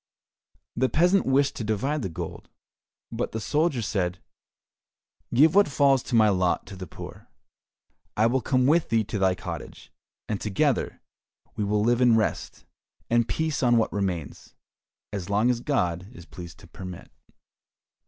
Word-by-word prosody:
The 130 - +1
peasant 180 +4 +3
wished 135 +1 +2
to - - -3
divide 130 +8 -1
the 95 - -3
gold, 80 - -7 0.6
but - - -3
the 110 - -2
soldier 145 0 0
said, 90 -3 -1 1.1
"Give 150 +6 +5
what 205 +1 +5
falls 140 -2 +3
to 125 - -3
my 110 -1 +6
lot 90 -3 +1
to 100 - -10
the 95 -1 -8
poor, - - -10 0.9
I 110 - +4
will 125 +3 +2
come 130 +2 +1
with 160 +4 +3
thee 115 -1 +2
to 105 0 -4
thy 95 -1 +3
cottage, - - -8 0.4
and 105 - -3
together 105 -3 0 0.5
we 105 - -2
will 105 +1 +1
live 120 +2 +2
in 120 -2 +5
rest 110 - -2 0.5
and 120 -1 +3
peace 160 +1 -1
on 120 -2 +4
what 110 - +1
remains, 90 -7 -4 0.6
as 95 -3 -4
long 105 +5 +3
as 120 - -2
God 90 - -1
is 120 -10 -13
pleased 85 -5 -10
to - - -14
permit." 90 -2 -9
115 Hz, 160 wpm, -26 LUFS, 95-130 Hz, 1.1 s, my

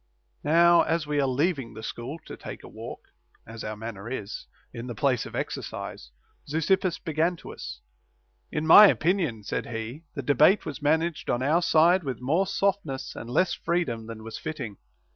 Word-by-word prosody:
2. 145 - -4
Now 170 +1 +6
as 165 -1 0
we 150 0 -2
were 140 - +2
leaving 135 - 0
the 110 - -8
school 120 +7 -5
to - - -8
take - - -9
a - - -10
walk - - -9 0.4
(as 115 0 -8
our 110 0 -5
manner 110 -1 -7
is) 110 -4 -5 0.3
in 120 0 -6
the 120 - -5
place 125 0 +1
of - - -9
exercise, - - -5 0.4
Zeuxippus 170 +4 +1
began 160 +3 0
to - - -10
us: - - -8 0.7
In 155 - -2
my 205 +6 +10
opinion, 165 - +1
said - - -3
he, 115 +7 -6
the 140 - -4
debate 150 - +4
was 150 - -6
man 155 +3 +3
aged 170 -2 -4
on 120 +1 +1
our 155 +6 +3
side 170 +2 +4
with 135 -3 -4
more 160 +10 +1
softness 195 -9 -1
and 115 - -7
less 175 +8 +2
freedom 135 -10 -1
than 115 -1 -8
was 115 0 -7
fitting. 125 -11 -5
145 Hz, 185 wpm, -27 LUFS, 115-170 Hz, 0.7 s, my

